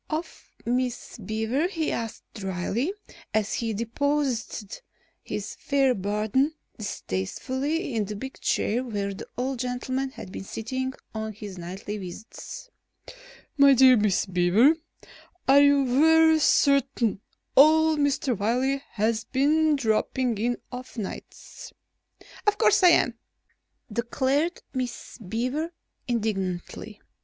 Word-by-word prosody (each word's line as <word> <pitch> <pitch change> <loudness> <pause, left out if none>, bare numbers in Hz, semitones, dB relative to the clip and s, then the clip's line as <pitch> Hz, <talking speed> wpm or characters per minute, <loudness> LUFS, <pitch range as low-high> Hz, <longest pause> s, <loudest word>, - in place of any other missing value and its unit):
Of 315 +2 -5 0.2
Miss 245 0 -2
Beaver 220 - -1
he 330 -5 -2
asked 230 -2 -4
drily 195 - -2 0.4
as 215 -1 +1
he 230 -1 -1
deposited 235 - -2 0.4
his - - -5
fair 275 -2 +2
burden 215 +9 0 0.2
distastefully 260 - -3
in 220 -2 0
the 210 +1 -6
big 265 +6 -7
chair 235 +4 0
where 205 -5 -3
the - - -9
old 255 0 -2
gentleman 255 +2 -2
had 185 - -10
been - - -6
sitting 260 +6 -4 0.2
on 220 0 -4
his 200 -3 -8
nightly 190 +4 -6
visits: 205 - -9 0.9
"My 280 -1 +8
dear 260 0 +7
Miss 210 -4 +2
Beaver, 190 - +4 0.7
are 275 +1 +7
you 285 -1 +5
very 320 +5 +5
certain 275 -8 +2 0.3
old 315 +2 +6
Mr. 285 -3 +1
Wiley 250 +7 0
has 220 +1 0
been 300 +3 +3
dropping 235 -1 0
in 240 +2 0
of 255 0 -8
nights?" 205 -4 -8 0.7
"Of 415 0 +3
course - - +4
I 360 - +8
am," 240 -8 +3 0.7
declared 270 +8 0
Miss 250 -2 -5
Beaver 250 - -2 0.4
indignantly. 210 -2 -3
245 Hz, 115 wpm, -26 LUFS, 215-280 Hz, 0.9 s, My